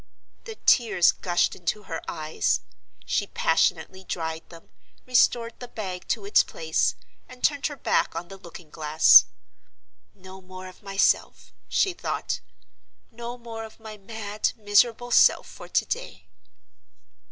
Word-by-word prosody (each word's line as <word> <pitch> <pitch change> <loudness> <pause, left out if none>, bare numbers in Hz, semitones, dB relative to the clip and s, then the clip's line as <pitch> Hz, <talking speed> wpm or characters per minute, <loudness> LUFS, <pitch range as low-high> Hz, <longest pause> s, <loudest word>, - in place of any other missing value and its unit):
The 445 - -7
tears 225 - +4
gushed 175 -2 0
into 185 +4 -3
her 165 -4 -6
eyes. 155 - -1 0.4
She - - -1
passionately 190 0 0
dried 160 -3 -5
them, 165 -1 -15 0.3
restored 240 -2 +2
the 245 - -8
bag 190 -6 -7
to - - -2
its 410 - +5
place, - - -1 0.3
and 255 0 -14
turned 285 -2 +2
her 295 - -7
back 270 - 0
on 170 +1 -5
the 195 - -11
looking 170 -3 -13
glass. 155 - +6 0.9
"No 190 0 -13
more 185 0 -11
of 185 -1 -13
myself," 195 -1 0 0.2
she 380 - +1
thought; 350 - -3 0.7
"no 235 +1 -7
more 230 -2 -8
of 220 0 -12
my 220 -1 -9
mad, 210 0 -4
miserable 225 +3 +2
self - - +5
for - - -12
to - - +1
day!" - - -6
205 Hz, 140 wpm, -25 LUFS, 180-240 Hz, 0.9 s, glass